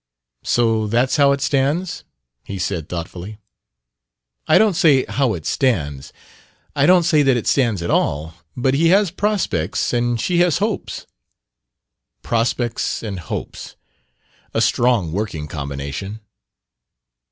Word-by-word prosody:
"So 115 -2 +1
that's 120 +6 +1
how 140 -1 +5
it 140 0 0
stands?" 145 +6 0 0.4
he 100 - -6
said 90 -4 -3
thoughtfully. 90 +4 -6 1.1
"I - - +6
don't 215 -2 +4
say 150 -6 +4
'how' 130 -6 0
it 80 - -9
stands. 75 - -1 0.6
I - - +3
don't 180 -1 +6
say 160 -3 +3
that 135 -3 +3
it 115 - -4
'stands' 115 -10 +1
at 85 - -2
all. 75 +3 0 0.2
But 130 +1 +1
he 160 +4 +3
has 195 +1 +4
prospects 185 - -1
and 120 -1 0
she 175 +8 0
has 175 -3 +3
hopes." 210 0 -3 1.2
"Prospects 120 0 -1
and 100 -4 -5
hopes, 80 - -7 0.8
a - - +2
strong 120 -9 +2
working 90 -5 -3
combination." 70 +8 -6
120 Hz, 130 wpm, -20 LUFS, 90-145 Hz, 1.2 s, I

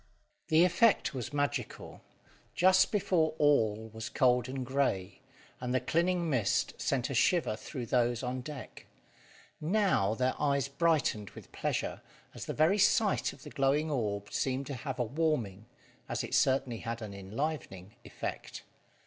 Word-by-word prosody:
The 160 +2 +5
effect 205 0 +3
was 125 -4 -5
magical. 145 -1 -3 0.5
Just 185 +1 +5
before 170 -6 +1
all 110 -7 +2
was 110 0 -6
cold 125 -1 +2
and 130 -1 -4
grey, 125 -8 -1 0.4
and 125 0 -2
the - - +4
clinging 170 +3 0
mist 125 -9 +1
sent 130 -1 0
a - - -2
shiver 150 -2 +2
through 125 +2 -6
those 120 +1 +1
on 125 +1 -3
deck; 140 +1 -9 0.7
now, 160 - +2
their 130 +2 +1
eyes 140 -2 +1
brightened 140 - +1
with - - -12
pleasure, - - -2 0.3
as - - -7
the - - -4
very 165 +7 +3
sight 210 +1 +3
of 135 - -15
the - - -10
glowing 145 +2 +1
orb 100 -6 -2
seemed 135 +1 -1
to 140 - -5
have 130 0 -5
a 125 - +1
warming 120 - -1 0.4
as - - -2
it - - -6
certainly 130 -3 +2
had 115 0 -5
an 105 -2 -7
enlivening 100 - -5
effect. - - -6
135 Hz, 150 wpm, -31 LUFS, 115-155 Hz, 0.7 s, The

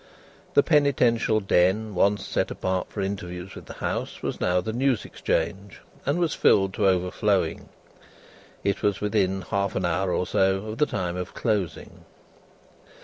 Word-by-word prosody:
The 145 - +6
penitential 125 -7 +3
den 95 +3 +2
once 100 +2 +2
set - - -1
apart 95 -1 -2
for 105 - -4
interviews 95 -2 -5
with - - -11
the - - -9
House, - - -4
was - - -3
now 90 0 +2
the 110 +5 -3
news 130 -2 +1
Exchange, 95 +4 -2 0.3
and 145 +4 +2
was 170 -3 +1
filled 95 -1 +3
to 105 -2 +2
overflowing. 90 -1 0 0.9
It 100 0 0
was 100 -4 +1
within 95 -3 0
half 100 +1 -1
an 90 - 0
hour 90 +2 0
or 90 - 0
so 95 +2 +1
of 110 - -6
the 150 - +3
time 90 -1 -3
of 90 0 -6
closing. 105 -7 -2
100 Hz, 155 wpm, -25 LUFS, 90-110 Hz, 0.9 s, The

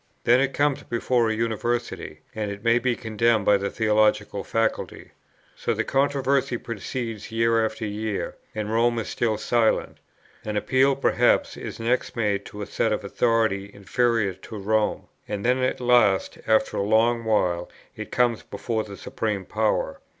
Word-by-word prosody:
Then 120 +2 +5
it 135 0 0
comes 145 -1 +1
before 120 0 0
a 110 - 0
University, 115 -7 -2
and 110 -2 -3
it 100 +1 -7
may 115 +1 +4
be 125 0 0
condemned 110 -2 +1
by 105 - +5
the 100 0 -2
theological 105 -2 +1
faculty. 115 0 -2 0.4
So - - -1
the - - 0
controversy 135 -2 +1
proceeds 115 0 -5
year 115 0 +2
after 110 0 -3
year, 105 0 -3 0.2
and 105 0 -3
Rome 120 +1 +2
is 115 - -3
still 110 -3 0
silent. 115 +1 +1 0.4
An 105 -1 -3
appeal 135 +5 +3
perhaps 140 - +2
is - - -7
next 120 +3 0
made 105 -3 0
to 105 0 -7
a - - -4
seat 110 - 0
of 105 - -1
authority 105 -2 +1
inferior 105 +1 0
to 100 +4 -10
Rome; 105 +1 0 0.2
and 100 0 -4
then 125 +1 +3
at 130 0 0
last 120 -6 +3
after 110 0 +2
a - - +1
long 115 +3 +2
while 90 -6 +1 0.3
it - - -7
comes 120 -2 +2
before 115 -3 -3
the 100 -2 -10
supreme 105 -4 -3
power. 110 +2 -1
110 Hz, 165 wpm, -24 LUFS, 105-120 Hz, 0.4 s, Then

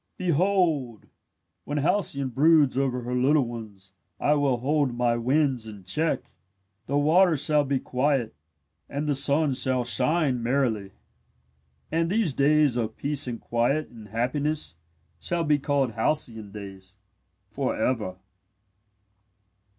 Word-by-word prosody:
"Behold, 170 - +1 0.6
when 145 - -4
Halcyone 145 -4 0
broods 145 +1 +4
over 130 -2 -1
her 125 +1 -4
little 135 +3 +3
ones 105 -5 -9 0.3
I 150 - +3
will 140 -4 +1
hold 140 0 0
my 120 -1 +1
winds 130 -1 +1
in 105 -3 -10
check. 155 - 0 0.7
The 140 - 0
waters 160 +1 +4
shall 150 -1 +3
be 140 -1 0
quiet 130 -2 0 0.6
and 145 +2 -3
the 145 - +2
sun 140 +1 +1
shall 130 -1 +1
shine 130 +1 +1
merrily. 115 -5 0 1.0
"And 165 +1 +1
these 200 -6 +1
days 145 -1 +3
of 110 -2 -3
peace 145 -1 -1
and 120 -2 -4
quiet 120 +6 0
and 110 -3 -13
happiness 125 - -2 0.4
shall 170 - -2
be 150 -2 +2
called 140 -3 0
'halcyon 110 -3 -2
days,' 95 -2 -10 0.5
for - - -2
ever." 110 -8 -1
135 Hz, 125 wpm, -26 LUFS, 120-150 Hz, 1.0 s, broods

